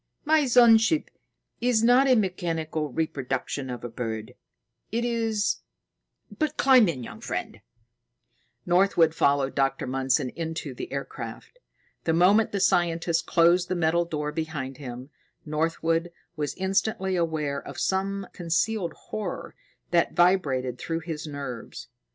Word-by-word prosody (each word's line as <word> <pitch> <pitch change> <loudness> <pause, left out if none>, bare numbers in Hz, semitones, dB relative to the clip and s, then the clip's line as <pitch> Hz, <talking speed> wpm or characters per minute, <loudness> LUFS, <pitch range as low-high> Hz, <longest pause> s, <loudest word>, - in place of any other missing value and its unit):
My 305 -2 +3
sun 235 -2 +7
ship 260 +8 0 0.5
is 240 -2 +2
not 250 +3 +5
a 255 - +5
mechanical 165 -6 -1
reproduction 135 -2 -3
of 125 -1 -6
a - - -3
bird. 115 0 -5 0.6
It 235 +2 0
is 225 -3 0 0.8
but, 310 -1 -1
climb 255 -7 +6
in, 130 -7 -4
young - - -9
friend." - - -5 1.0
Northwood 175 -3 +3
followed 140 -3 +2
Dr. 135 -1 0
Mundson 130 0 0
into 160 -4 -4
the 125 - -7
aircraft. 140 - -7 0.5
The 160 - +2
moment 195 +6 +4
the 200 - -1
scientist 170 -2 +1
closed 175 +1 +4
the 185 - -1
metal 170 0 +2
door 150 -3 -3
behind 150 -5 -4
them, 130 0 -8 0.3
Northwood 165 +2 0 0.2
was 150 -2 -3
instantly 190 0 0
aware 155 -5 -1
of - - -8
some 195 +1 -1
concealed 175 +1 -1
horror 210 -5 -6 0.4
that 170 -1 +2
vibrated 140 -9 +2
through 165 0 -3
his 160 -2 -5
nerves. 140 -5 -7
165 Hz, 130 wpm, -26 LUFS, 145-195 Hz, 1.0 s, sun